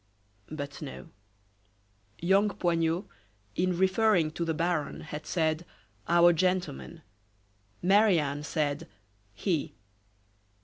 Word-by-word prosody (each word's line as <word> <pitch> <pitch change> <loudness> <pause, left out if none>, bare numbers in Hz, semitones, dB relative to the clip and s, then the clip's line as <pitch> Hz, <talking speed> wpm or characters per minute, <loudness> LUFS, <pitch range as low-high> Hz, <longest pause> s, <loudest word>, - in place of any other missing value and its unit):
But 145 -2 -6
no. 145 -3 -8 1.1
Young 195 +4 +3
Poignot, 170 0 0 0.5
in 180 0 +1
referring 190 -3 +3
to 170 - -3
the 165 -1 -1
baron 165 -2 -1
had 150 0 -7
said: 160 -1 0 0.4
"our 175 0 +6
gentleman," 175 - -1 0.8
Marie 200 +1 +5
Anne 145 -1 -1
said: 150 -1 -2 0.5
"he." 170 -7 -1
170 Hz, 95 wpm, -29 LUFS, 155-185 Hz, 1.1 s, our